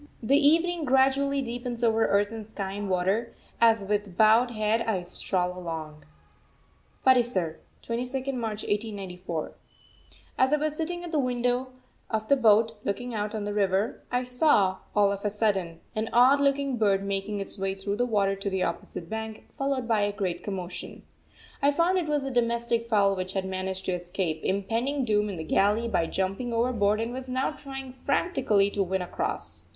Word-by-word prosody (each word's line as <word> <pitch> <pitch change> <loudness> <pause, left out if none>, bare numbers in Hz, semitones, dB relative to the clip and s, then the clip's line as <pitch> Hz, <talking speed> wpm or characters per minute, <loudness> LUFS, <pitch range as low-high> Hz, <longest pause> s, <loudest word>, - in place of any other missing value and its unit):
The 270 +5 +4
evening 325 +4 +3
gradually 270 +1 +3
deepens 240 0 -4
over 225 -1 +3
earth 205 +1 +2
and 225 -1 -6
sky 200 -2 -5
and 200 0 -4
water, 190 +6 0 0.3
as 225 -3 +5
with 205 -2 -2
bowed 220 +3 +5
head 215 0 0
I 215 -6 -1
stroll 180 0 -1
along. 160 -4 -6 1.0
PATISAR, 240 -11 +3 0.2
22nd 255 +3 -3
March 220 -4 -3
1894. 190 -6 -3 0.9
As 260 +2 +4
I - - +5
was 305 0 -1
sitting 345 +2 -3
at 345 - -6
the 310 - +1
window 250 0 0 0.4
of 220 -1 -2
the 280 - +6
boat, 225 -2 +4
looking 245 +5 -3
out 210 0 -2
on 215 - -3
the 205 0 -3
river, 200 +3 0
I 250 0 +1
saw, 250 -7 +3 0.2
all 205 -1 +4
of 200 0 -4
a 210 - +1
sudden, 195 -6 -1
an 220 +1 -1
odd 260 +4 +5
looking 275 -2 +1
bird 200 -3 +2
making 200 +1 -2
its 195 0 -5
way 195 0 -1
through 200 +1 -3
the 245 - +2
water 200 -3 +1
to 195 +1 -3
the 190 -1 0
opposite 170 0 -4
bank, 220 +1 -5
followed 275 -3 -1
by 225 -3 +2
a 205 0 +1
great 195 -3 -3
commotion. 185 -3 -6 0.6
I 280 - +5
found 335 +6 +2
it 335 - -3
was 295 -2 0
a 270 - -3
domestic 235 -1 0
fowl 200 -3 +3
which 185 0 -3
had 190 -1 -1
managed 190 0 -3
to - - 0
escape 175 -2 -3
impending 230 +8 0
doom 210 -2 +1
in 195 - -5
the 160 - -4
galley 205 +8 +2
by 170 -7 +1
jumping 195 +8 -2
overboard 230 -3 +2
and 230 +1 -2
was 260 0 -6
now 260 +3 0
trying 270 -3 -8
frantically 255 - +1
to 200 - -1
win 190 0 0
across. 180 - -3
220 Hz, 180 wpm, -27 LUFS, 195-250 Hz, 1.0 s, the